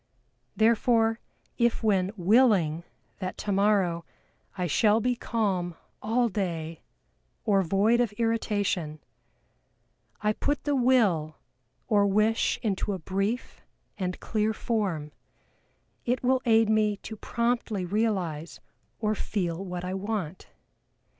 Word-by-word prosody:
Therefore 225 0 +3 0.4
if 235 -1 +2
when 195 -4 +2
willing 185 -5 +3 0.4
that 185 -1 -4
tomorrow 195 -4 +1 0.5
I 180 - -1
shall 210 +6 +3
be 245 +2 0
calm 195 -8 -1 0.3
all 235 +3 +1
day 170 -6 -3 0.6
or 200 -3 +3
void 200 +6 +2
of 235 -4 0
irritation, 205 -8 -1 1.2
I 210 0 +1
put 290 +6 -2
the 290 -1 0
will 210 - +2 0.5
or 205 -3 +3
wish 215 +3 +2
into 205 -1 -1
a - - -2
brief 195 +7 -3 0.3
and 180 -2 -3
clear 215 0 0
form, 190 -11 -2 0.9
it 245 +1 -1
will 255 +1 +3
aid 225 -1 +4
me 215 -1 +2
to 220 - -6
promptly 235 -3 -1
realize 180 -6 -2 0.4
or 215 +5 0
feel 185 -4 -2
what 180 -1 -5
I 185 - -3
want. 190 -4 -4
210 Hz, 115 wpm, -27 LUFS, 180-225 Hz, 1.2 s, aid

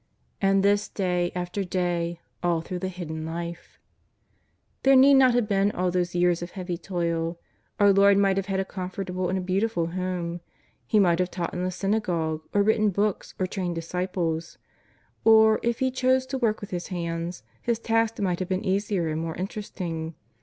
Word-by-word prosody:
And 195 0 +3
this 205 +1 +2
day 180 -3 0
after 180 +3 -2
day, 175 -2 -1 0.2
all 170 -2 +1
through 180 +2 -5
the 185 - -2
Hidden 165 -4 -5
Life! 170 +1 -6 1.0
There 270 0 +5
need 270 +2 +7
not 260 -3 +6
have 240 -3 +2
been 200 -1 +2
all 180 0 0
those 175 -1 -1
years 175 -1 +2
of 175 - -5
heavy 180 -2 -4
toil. 170 -1 -2 0.4
Our 205 -1 +6
Lord 200 0 +6
might 195 -1 +3
have 195 0 -1
had 195 -1 -1
a 190 - 0
comfortable 185 -1 -4
and 190 - 0
a - - -1
beautiful 185 -1 0
home. 180 -2 -3 0.5
He 215 - +2
might 175 -3 +4
have 180 0 +1
taught 175 -2 -4
in 180 - -3
the 185 - 0
s^iiagogue, 180 -5 -1
or 205 - +3
written 215 0 +3
books, 200 +1 -1
or 185 - 0
trained 180 -2 -3
disciples. 170 -1 -3 0.7
Or, 220 -1 +6
if 235 0 0
He 260 -1 +1
chose 260 0 +2
to 265 0 -4
work 220 -3 +1
with 205 - -8
His 175 -1 -3
hands. 170 -1 -4 0.2
His 235 -1 0
tasks 225 0 0
might 180 -3 0
have 185 - -3
been 185 0 -1
easier 195 -2 0
and 155 +1 -2
more 165 -1 -4
interesting. 175 -4 -5
185 Hz, 185 wpm, -26 LUFS, 175-205 Hz, 1.0 s, need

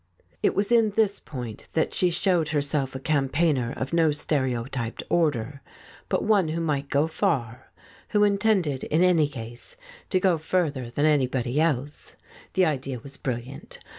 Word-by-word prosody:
It - - +2
was 200 +3 0
in 225 -3 +4
this 205 -3 +2
point 120 -6 -8
that 160 - 0
she 180 - +2
showed 175 -2 +1
herself 145 -3 -1
a - - -3
cam 140 -1 0
paigner 140 -6 +1
of 130 +5 -4
no 165 -2 +4
stereotyped 130 -5 -2
order, 140 -5 0 0.5
but - - 0
one 205 -5 +3
who 160 +2 -2
might 145 -4 -1
go 140 +2 +2
far, 150 - -2 0.4
who 210 -1 +3
intended 200 - +2
in 160 +4 +2
any 170 -5 +4
case 120 - -8 0.3
to 185 - +2
go 180 -3 +2
further 150 -7 -1
than 145 +5 0
anybody 130 -2 +1
else. 145 -3 -2 0.4
The 185 - +4
idea 135 -4 -2
was 135 +4 -10
brilliant. 125 +1 -5
150 Hz, 160 wpm, -25 LUFS, 130-175 Hz, 0.5 s, in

